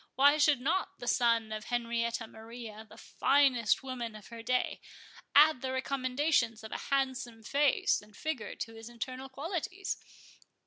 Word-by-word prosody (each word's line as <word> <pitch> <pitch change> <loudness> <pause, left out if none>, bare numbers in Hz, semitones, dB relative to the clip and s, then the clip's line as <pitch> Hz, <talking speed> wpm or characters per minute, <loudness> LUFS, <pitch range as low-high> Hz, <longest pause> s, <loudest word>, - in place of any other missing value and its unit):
Why 285 +3 +6
should 290 -3 +5
not 320 +9 -1
the 245 - -8
son 230 -2 +2
of 215 0 -5
Henrietta 235 -1 -1
Maria, 220 -1 -10
the 215 - -14
finest 265 -5 +3
woman 245 -4 -5
of 210 -2 -12
her 230 -1 -8
day, 250 +2 0 0.5
add 295 -3 +7
the 260 - -2
recommendations 260 -3 0
of 220 - -8
a - - -3
handsome 260 -4 -1
face 280 +4 +2
and 210 0 -18
figure 310 -8 -3
to 225 - -5
his 225 +1 -10
internal 255 +3 -6
qualities? 345 +7 -3
245 Hz, 150 wpm, -31 LUFS, 230-275 Hz, 0.5 s, add